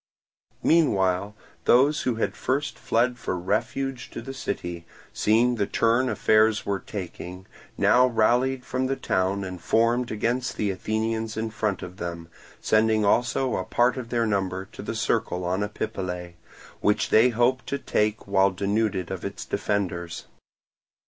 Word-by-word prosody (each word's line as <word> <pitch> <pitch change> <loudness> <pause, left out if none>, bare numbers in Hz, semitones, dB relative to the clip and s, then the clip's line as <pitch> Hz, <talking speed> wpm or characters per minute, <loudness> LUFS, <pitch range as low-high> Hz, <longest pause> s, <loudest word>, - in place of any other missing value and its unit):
Meanwhile 100 - +2 0.3
those 140 +5 +4
who 125 - 0
had 115 - 0
at - - -20
first 140 +3 -2
fled 120 +1 +1
for 90 - -2
refuge 130 +8 -2
to - - -7
the 135 - -6
city, 85 -9 -5 0.3
seeing 115 +4 +3
the 100 -2 0
turn 115 +4 +2
affairs 110 -2 +3
were 100 -1 -1
taking, 90 -1 -7 0.3
now 125 +1 +5
rallied 125 +3 +2
from 130 0 -1
the 135 - 0
town 95 -3 0
and 90 -2 -6
formed 120 +2 +2
against 120 +4 -1
the 105 -2 0
Athenians 110 +3 -2
in 110 0 -2
front 105 -3 -2
of 90 0 -9
them, 85 -1 -6 0.3
sending 110 -1 +2
also 120 +4 +2
a 95 - -2
part 120 +6 +2
of 125 -3 -6
their 120 -1 +1
number 95 -3 -1
to - - -9
the - - -4
Circle 90 0 -1
on 90 +3 0
Epipolae, 95 -4 -4 0.5
which 105 - +1
they 115 +3 +6
hoped 125 +2 +1
to 140 - -1
take 105 -5 -1
while 100 -1 +4
denuded 100 -1 -1
of - - -5
its - - -5
defenders. 85 -5 -2
110 Hz, 155 wpm, -25 LUFS, 95-120 Hz, 0.5 s, they